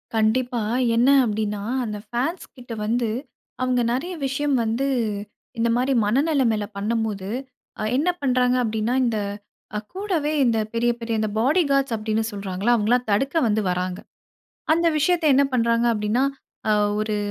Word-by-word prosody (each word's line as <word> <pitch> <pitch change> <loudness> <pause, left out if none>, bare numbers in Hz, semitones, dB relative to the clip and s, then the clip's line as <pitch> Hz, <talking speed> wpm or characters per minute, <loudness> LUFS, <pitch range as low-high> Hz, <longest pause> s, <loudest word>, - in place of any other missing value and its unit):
கண்டிப்பா. 235 +2 +1 0.3
என்ன 240 +3 +4 0.2
அப்படீன்னா, 210 -2 -2 0.2
அந்த 210 -1 -4
ஃபேன்ஸ்கிட்ட 250 -2 -4
வந்து 235 0 0 0.5
அவங்க 250 -1 +1
நெறைய 345 +8 -3
விஷயம் 280 +1 0
வந்து 230 +5 0 0.7
இந்த 235 +1 +1
மாரி 255 +2 +1
மனநிலைமைல 245 -3 +2
பண்ணும்போது, 210 -2 -2 0.5
அ - - -2
என்ன 315 +6 +2
பண்றாங்க 250 -2 +2
அப்படீன்னா, 220 +2 -1
இந்த 225 -2 0 0.6
அ 210 - 0
கூடவே 365 -7 -1
இந்த 230 -2 +2 0.2
பெரிய, 240 +1 +2
பெரிய 230 0 -3
இந்த 215 -1 0
பாடிகார்ட்ஸ் 275 -2 +2
அப்படீன்னு 220 +1 -1
சொல்றாங்கல்ல, 200 +3 -1
அவங்கல்லாம் 235 +2 +1
தடுக்க 270 +10 +1
வந்து 215 0 +1
வர்றாங்க. 180 +1 -2 0.7
அந்த 335 +1 +2
விஷயத்த 335 +2 +2
என்ன 280 - +5
பண்றாங்க 235 -1 +2
அப்படீன்னா, 210 +3 0 0.5
"அ - - +5 0.3
ஒரு 215 0 -1
235 Hz, 135 wpm, -23 LUFS, 215-270 Hz, 0.7 s, என்ன